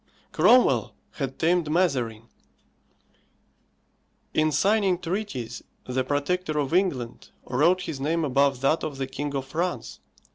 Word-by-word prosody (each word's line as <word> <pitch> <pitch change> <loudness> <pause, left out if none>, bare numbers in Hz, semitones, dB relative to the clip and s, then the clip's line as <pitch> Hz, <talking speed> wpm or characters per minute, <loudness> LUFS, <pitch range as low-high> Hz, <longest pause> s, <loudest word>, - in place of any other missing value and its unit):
Cromwell 250 0 +4 0.2
had - - -5
tamed 170 -1 +1
Mazarin; 130 -10 0 2.1
in 155 0 +2
signing 195 +4 +2
treaties 170 - -4 0.2
the 130 +1 -1
Protector 150 +4 -1
of 145 +1 -1
England 135 -11 -1 0.2
wrote 165 +9 +2
his 160 -6 -5
name 160 +4 0
above 135 -1 +2
that 145 +4 +2
of 145 -3 -4
the 135 - -2
King 140 +2 -5
of 135 -1 -2
France. 170 +6 -3
150 Hz, 120 wpm, -25 LUFS, 135-180 Hz, 2.1 s, Cromwell